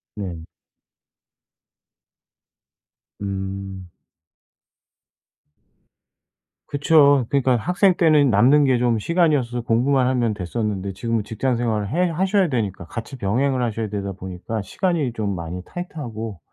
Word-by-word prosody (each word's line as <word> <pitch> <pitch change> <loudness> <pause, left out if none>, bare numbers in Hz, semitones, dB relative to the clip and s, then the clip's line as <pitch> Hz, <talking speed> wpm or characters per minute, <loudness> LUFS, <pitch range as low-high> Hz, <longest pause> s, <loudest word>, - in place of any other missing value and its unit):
네. 90 -6 -6 2.8
음. 95 -1 -5 2.8
그쵸. 145 -2 +4
그러니까 135 -2 +2
학생 180 - +2
때는 155 -5 +4
남는 130 +8 +5
게 130 -2 +3
좀 120 -2 +2
시간이어서서 145 - +1
공부만 125 +3 +2
하면 120 -4 +1
됐었는데 100 0 -3
지금은 115 +3 -2
직장 120 +5 -1
생활을 110 -4 -1
해 175 +6 +1
하셔야 190 +2 +1
되니까 105 -10 -2
같이 115 +8 -7
병행을 130 +5 0
하셔야 115 -1 -2
되다 100 -1 -3
보니까 95 +4 -5
시간이 150 - -1
좀 105 -4 -2
많이 85 +1 -5
타이트하고 115 - -6
115 Hz, 255 characters per minute, -22 LUFS, 100-140 Hz, 2.8 s, 남는